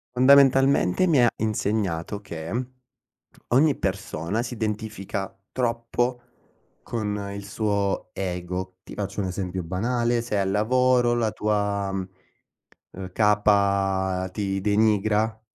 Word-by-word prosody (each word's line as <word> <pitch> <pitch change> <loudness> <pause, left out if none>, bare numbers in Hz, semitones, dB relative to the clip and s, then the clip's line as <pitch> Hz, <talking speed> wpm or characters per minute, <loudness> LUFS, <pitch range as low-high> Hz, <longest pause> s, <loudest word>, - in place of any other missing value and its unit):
Fondamentalmente, 135 - +5
mi 150 -8 +4
ha 120 - +6
insegnato 105 -4 -1
che, 100 +5 -4 0.8
ogni 140 +4 +4
persona 95 +1 -2
si 125 - -5
identifica 105 -3 -4 0.2
troppo 120 0 -1 0.6
con 105 -3 -3
il 100 0 -7
suo 100 0 -1
ego. 90 0 -4
Ti - - -10
faccio 100 0 -4
un 95 - -1
esempio 90 -1 -4
banale: 120 +6 0
sei 105 -4 -2
al 95 0 0
lavoro, 125 +3 +3
la 115 -3 0
tua, 100 -2 -1
mhmm, 95 -1 -3 0.8
ehm, 95 0 -8
capa 100 -3 +2
ti 95 0 -2
denigra, 110 +1 +1
105 Hz, 110 wpm, -25 LUFS, 95-115 Hz, 0.8 s, ha